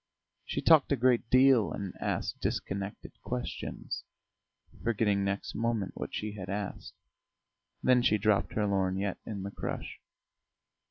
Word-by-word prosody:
She - - -3
talked 160 -4 +6
a - - +5
great 125 -2 +2
deal 130 -3 +5
and 100 -2 -4
asked - - -2
disconnected 100 +1 -3
questions, 60 - -4 0.8
forgetting 105 -3 +2
next 100 0 -2
moment 115 -4 -1
what - - -5
she 105 0 -3
had 95 -2 -7
asked; 100 0 -4 0.9
then 125 -1 +5
she 110 -3 +4
dropped 105 0 +2
her 105 - +1
lorgnette 95 0 0
in 100 -3 -4
the 100 - -4
crush. - - -5
105 Hz, 130 wpm, -30 LUFS, 100-115 Hz, 0.9 s, talked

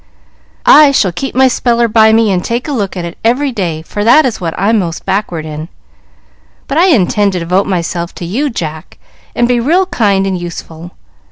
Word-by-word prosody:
"I 295 0 +7
shall 200 -9 +1
keep 255 +10 -5
my 260 +1 +5
Speller 235 -1 +1
by 220 -1 +4
me 220 -1 +3
and 180 -2 -1
take 235 +4 -3
a - - -3
look 200 -8 -3
at 175 - -4
it 170 - -9
every 260 +5 +1
day, 170 -8 -3
for 205 +5 -4
that 250 +8 +5
is 235 -6 -3
what 165 -2 -3
I'm 215 +3 +2
most 170 -3 -4
backward 180 -5 -2
in. 155 +1 -7 1.0
But 295 - 0
I 360 - +4
intend 205 - +2
to 180 - -2
devote 180 +4 0
myself 175 -2 -3
to 175 - -7
you, 255 - -2
Jack, 160 - -6 0.4
and 240 - +2
be 245 -1 +1
real 335 +10 +2
kind 200 - 0
and 190 -1 -1
useful. 170 -1 -8
205 Hz, 200 wpm, -12 LUFS, 175-240 Hz, 1.0 s, I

